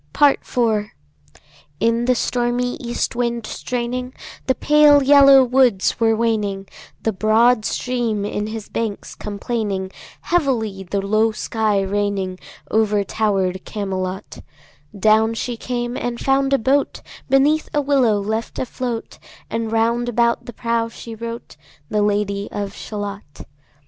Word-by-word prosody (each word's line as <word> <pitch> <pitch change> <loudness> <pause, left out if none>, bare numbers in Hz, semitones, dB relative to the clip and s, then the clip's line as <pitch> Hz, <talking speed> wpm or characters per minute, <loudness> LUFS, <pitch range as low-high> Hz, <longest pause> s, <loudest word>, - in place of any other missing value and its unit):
Part 290 -2 +4
IV. 220 -4 0 0.9
In 230 +1 +1
the 250 0 +3
stormy 245 +1 0
east 240 0 -3
wind 235 -2 -1
straining, 250 +2 -4 0.3
The 260 - +2
pale 295 0 +5
yellow 275 -1 +7
woods 250 -6 +2
were 225 -1 +3
waning, 210 -4 -1 0.4
The 225 - 0
broad 220 +3 +3
stream 235 -5 -1
in 210 0 -3
his 220 -1 -6
banks 220 -3 -4
complaining, 205 -2 -3 0.3
Heavily 240 - 0
the 195 0 -1
low 215 +2 +2
sky 215 -2 0
raining 195 -2 -2 0.3
Over 210 -2 +2
tower'd 195 -3 -1
Camelot; 190 -2 -4 0.6
Down 220 +2 +3
she 240 +1 -3
came 240 +1 -3
and 240 -2 -3
found 270 0 +1
a - - +5
boat 270 +4 0 0.3
Beneath 285 +4 +3
a 295 - +1
willow 265 -7 +2
left 220 +3 -3
afloat, 245 -2 -4 0.3
And 225 -1 -2
round 235 +2 +1
about 235 0 +1
the 240 - -7
prow 230 0 -1
she 230 0 -9
wrote 230 -2 -7 0.3
The 210 - +1
Lady 205 -1 0
of 200 -1 -4
Shalott. 205 -8 -7
225 Hz, 130 wpm, -20 LUFS, 205-245 Hz, 0.9 s, yellow